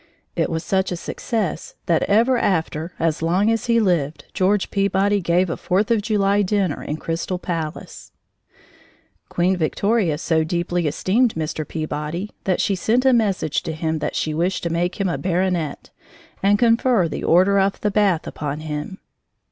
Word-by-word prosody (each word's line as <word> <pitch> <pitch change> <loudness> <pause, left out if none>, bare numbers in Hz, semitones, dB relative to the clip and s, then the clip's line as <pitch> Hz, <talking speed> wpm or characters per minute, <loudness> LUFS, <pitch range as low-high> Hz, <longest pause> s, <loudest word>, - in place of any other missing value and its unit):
It - - 0
was 160 0 -2
such 190 -1 0
a - - -1
success 185 0 -3
that 170 - +2
ever 230 +6 +4
after, 165 -5 -1
as 165 -1 0
long 185 +7 +2
as 225 +1 -1
he 230 -1 +4
lived, 160 -8 0
George 195 +1 +1
Peabody 200 0 +1
gave 175 +2 +2
a 165 - -2
Fourth 200 +4 0
of 225 -2 +3
July 205 -1 +2
dinner 195 -5 0
in 150 - -4
Crystal 165 +3 -3
Palace. 165 -4 -5 1.2
Queen 180 +2 +1
Victoria 180 0 +1
so 160 0 +1
deeply 175 0 -1
esteemed 215 - +1
Mr. 155 -1 -3
Peabody 155 +4 -4
that 185 -2 +1
she 200 - +1
sent 225 +7 +1
a 265 - +5
message 200 -9 +1
to 160 - -4
him 160 0 -2
that 150 - -3
she 155 - -1
wished 175 +4 -1
to 170 - -1
make 175 +3 -1
him 195 - +1
a 170 - -2
baronet, 180 -4 -1 0.5
and 200 +1 +4
confer 230 -4 +3
the 155 - -5
Order 190 +4 +4
of 195 0 +1
the 210 - 0
Bath 195 -5 +2
upon 150 0 -4
him. 155 +4 -5
180 Hz, 170 wpm, -21 LUFS, 160-205 Hz, 1.2 s, a